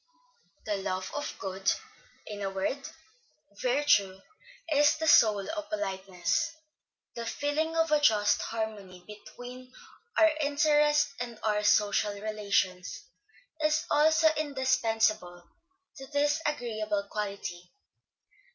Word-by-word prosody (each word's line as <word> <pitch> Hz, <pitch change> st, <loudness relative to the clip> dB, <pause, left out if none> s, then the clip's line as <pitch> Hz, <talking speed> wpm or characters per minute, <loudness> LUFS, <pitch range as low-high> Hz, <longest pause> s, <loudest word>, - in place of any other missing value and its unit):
The 210 Hz, -2 st, -1 dB
love 185 Hz, -1 st, -3 dB
of 290 Hz, 0 st, -4 dB
good, 190 Hz, 0 st, -1 dB, 0.5 s
in 205 Hz, -1 st, -7 dB
a 195 Hz, -, -1 dB
word, 195 Hz, +9 st, -3 dB, 0.7 s
virtue, 290 Hz, -, +2 dB, 0.5 s
is 295 Hz, +1 st, +4 dB
then -, -, -13 dB
the 320 Hz, -, 0 dB
soul 210 Hz, -8 st, +5 dB
of 310 Hz, -1 st, -6 dB
politeness; 195 Hz, -, -2 dB, 0.6 s
the 235 Hz, -, -5 dB
feeling 310 Hz, +5 st, -1 dB
of 325 Hz, -1 st, +1 dB
a 300 Hz, -, +5 dB
just 205 Hz, -7 st, +3 dB
harmony 210 Hz, -5 st, -5 dB
between 245 Hz, +5 st, -11 dB, 0.5 s
our 325 Hz, 0 st, +6 dB
interest 295 Hz, 0 st, +3 dB
and 240 Hz, -2 st, -5 dB
our 210 Hz, -1 st, +1 dB
social 210 Hz, 0 st, +2 dB
relations, 200 Hz, -3 st, -2 dB, 0.6 s
is 305 Hz, 0 st, +2 dB
also 315 Hz, +2 st, +5 dB
indispensable 225 Hz, -, 0 dB, 0.5 s
to 270 Hz, -, -9 dB
this 290 Hz, +2 st, +1 dB
agreeable 215 Hz, -7 st, -2 dB
quality. 200 Hz, -4 st, -5 dB
225 Hz, 110 wpm, -29 LUFS, 200-295 Hz, 0.7 s, our